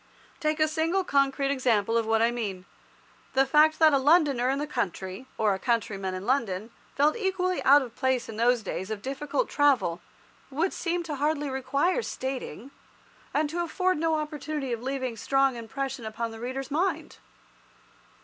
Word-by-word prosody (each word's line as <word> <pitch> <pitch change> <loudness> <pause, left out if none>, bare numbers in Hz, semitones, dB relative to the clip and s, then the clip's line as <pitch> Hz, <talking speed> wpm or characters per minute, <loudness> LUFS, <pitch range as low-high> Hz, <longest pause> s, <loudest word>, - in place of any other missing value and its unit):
Take 305 -1 0
a 310 - +4
single 325 +5 0
concrete 275 -3 +1
example 230 -5 +1
of 230 -1 +1
what 225 0 +3
I 235 - +3
mean. 200 -6 -4 0.7
The 270 +1 +4
fact 305 +3 +4
that 315 -2 +6
a 275 - +4
Londoner 280 -4 +3
in 270 - +1
the 295 - -2
country, 200 - -4
or 215 -2 +2
a 190 - -4
countryman 200 -5 -1
in 185 +1 -6
London, 225 -5 -1 0.2
felt 295 +2 +3
equally 370 -4 -1
out 285 +1 +6
of 240 -2 -10
place 260 -2 0
in 220 - -7
those 240 0 +3
days 190 0 -4
of 215 -2 -5
difficult 280 - -2
travel, 270 - +2 0.5
would 320 +7 -1
seem 345 0 -2
to 305 -3 -5
hardly 295 0 0
require 275 - 0
stating, 260 - -5 0.6
and 300 +1 +1
to 345 +1 -1
afford 365 0 0
no 325 0 +1
opportunity 300 -3 -3
of 230 - -4
leaving 260 -1 -3
a - - -13
strong 270 +2 +2
impression 245 +2 -5
upon 225 +1 -4
the 225 - -9
reader's 260 +3 -5
mind. 350 +6 -1
270 Hz, 175 wpm, -27 LUFS, 230-305 Hz, 0.7 s, that